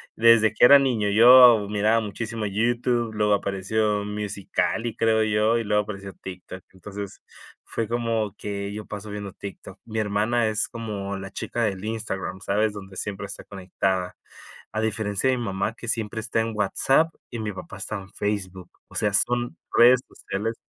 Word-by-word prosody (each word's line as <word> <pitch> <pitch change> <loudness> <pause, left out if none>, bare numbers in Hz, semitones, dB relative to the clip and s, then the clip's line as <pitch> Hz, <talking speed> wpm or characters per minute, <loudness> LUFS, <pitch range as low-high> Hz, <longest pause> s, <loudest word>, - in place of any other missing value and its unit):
Desde 115 -1 +5
que 110 - +5
era 140 +3 +9
niño, 120 -7 +1
yo 120 -1 +8
miraba 105 +2 +2
muchísimo 110 +1 -4
YouTube, 120 +2 0
luego 105 -1 +2
apareció 105 +2 -1
Musical.ly, 105 +2 -2
creo 110 -1 +2
yo, 110 +2 +2
y - - -2
luego 105 0 +1
apareció 100 -2 -8
TikTok. 90 0 -10
Entonces, 100 +1 -8 0.4
fue 115 - -3
como 115 -3 -1
que 100 -1 -5
yo 105 0 -6
paso 105 0 -7
viendo 100 -2 -6
TikTok. 100 -1 -9
Mi 110 -1 -4
hermana 110 +3 +1
es 110 0 +1
como 105 -4 -5
la 95 0 -7
chica 120 - -4
del 100 -2 -2
Instagram, 105 -4 -4
¿sabes? 105 +2 0
Donde 95 -2 -10
siempre 100 +1 -4
está - - -7
conectada. 95 -1 -3 0.6
A 110 - -2
diferencia 110 +2 0
de 130 - 0
mi 120 - -3
mamá, 95 +2 -2
que 120 - -9
siempre 110 -1 -1
está 115 0 -1
en 115 0 -2
WhatsApp 135 +9 +2 0.2
y 120 - -5
mi 110 -1 -3
papá 95 - -9
está 110 - -3
en 95 0 -11
Facebook, 95 -3 -4 0.2
o - - -17
sea, 105 -2 +1
son 120 +4 +1 0.2
redes 125 +1 +6
sociales 110 +4 -4
105 Hz, 170 wpm, -24 LUFS, 100-115 Hz, 0.6 s, era